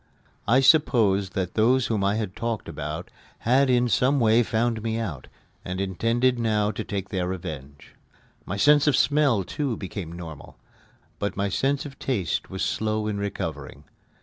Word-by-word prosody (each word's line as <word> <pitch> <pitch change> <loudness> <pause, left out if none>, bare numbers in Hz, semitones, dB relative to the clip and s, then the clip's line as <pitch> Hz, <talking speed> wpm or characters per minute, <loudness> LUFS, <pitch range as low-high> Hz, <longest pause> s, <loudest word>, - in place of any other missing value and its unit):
I 125 +5 +5
supposed 110 - +3
that 90 -2 -2
those 125 +4 +3
whom 105 -4 -1
I 100 +1 +2
had 105 -4 -3
talked 115 -4 -3
about 75 +4 -6 0.3
had 130 +3 +3
in 125 -1 +3
some 130 +4 +2
way 115 0 +4
found 115 0 0
me 110 0 -2
out, 90 - -5 0.4
and 90 +1 -4
intended 115 +6 +1
now 105 -2 +1
to 100 - -5
take 100 -1 -4
their 90 -3 -2
revenge. 75 -6 -7 0.5
My 100 - -5
sense 145 +6 +5
of 145 - +4
smell, 145 -8 +3
too, 130 +3 -3
became 95 -3 -6
normal; 80 -4 -9 0.6
but 100 -1 -3
my 100 0 0
sense 135 +8 0
of 140 -2 -10
taste 100 - -2
was 95 0 -2
slow 110 0 -1
in 105 -1 -2
recovering. 100 -1 -5
110 Hz, 165 wpm, -25 LUFS, 95-125 Hz, 0.6 s, I